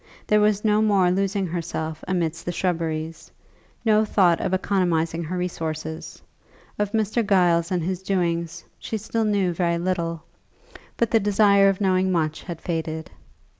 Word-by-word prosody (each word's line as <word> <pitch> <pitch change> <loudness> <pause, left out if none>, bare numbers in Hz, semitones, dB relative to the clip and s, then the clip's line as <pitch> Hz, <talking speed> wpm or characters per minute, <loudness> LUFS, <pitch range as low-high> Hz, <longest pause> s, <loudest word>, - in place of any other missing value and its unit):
There 210 0 +3
was 210 0 +2
no 210 0 +3
more 195 -4 +3
losing 195 +1 0
herself 160 -2 -4
amidst 170 -3 -1
the 175 - -3
shrubberies, 165 -3 -3 0.6
no 215 -1 +4
thought 185 -5 +3
of - - -1
economizing 175 -4 0
her 180 +3 -4
resources. 160 -3 -5 0.6
Of 210 -1 0
Mr. 220 +1 +1
Giles 175 -4 +3
and 180 -3 0
his 185 +1 -2
doings 170 -4 -1 0.2
she 220 - -4
still 220 +1 -2
knew 200 -4 +1
very 170 0 0
little, 170 -2 -2 0.7
but 235 - +1
the 225 - +5
desire 200 -1 +4
of 195 - -1
knowing 190 -1 +2
much 160 -3 -1
had 170 -3 -7
faded. 160 -2 -4
180 Hz, 150 wpm, -23 LUFS, 165-200 Hz, 0.7 s, the